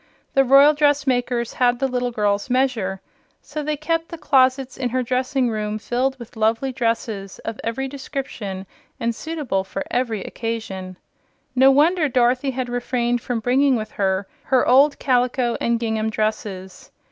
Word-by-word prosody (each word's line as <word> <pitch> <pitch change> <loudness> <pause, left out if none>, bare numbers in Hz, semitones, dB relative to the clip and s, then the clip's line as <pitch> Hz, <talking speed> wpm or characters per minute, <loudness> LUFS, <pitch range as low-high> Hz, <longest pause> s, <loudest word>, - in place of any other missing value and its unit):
The 270 - +5
royal 275 +3 +7
dressmakers 265 -5 +1
had 245 -1 +2
the 270 - 0
little 250 -1 -1
girl's 205 -1 0
measure, 240 -7 0 0.4
so 300 +1 -6
they 300 0 -2
kept 330 +2 -1
the 335 - -7
closets 265 -3 +2
in 255 -2 -2
her 255 +1 0
dressing 255 +1 0
room 215 -1 -2
filled 255 +4 -1
with 235 -1 -12
lovely 225 +4 +1
dresses 230 -5 -2
of 225 -1 -5
every 240 +4 -2
description 260 -8 -6 0.3
and 235 0 0
suitable 285 -8 -3
for 195 0 -5
every 230 -5 -1
occasion. 195 -5 -5 0.6
No 265 +1 +6
wonder 305 +3 +3
Dorothy 250 +1 +2
had 255 -1 -3
refrained 245 0 -1
from 235 -2 -3
bringing 260 +3 +3
with 215 -2 -4
her 190 0 -1 0.2
her 260 -2 +2
old 280 +3 +5
calico 250 -2 +1
and 235 0 +1
gingham 220 -1 -1
dresses! 210 -3 -4
245 Hz, 155 wpm, -22 LUFS, 220-270 Hz, 0.6 s, royal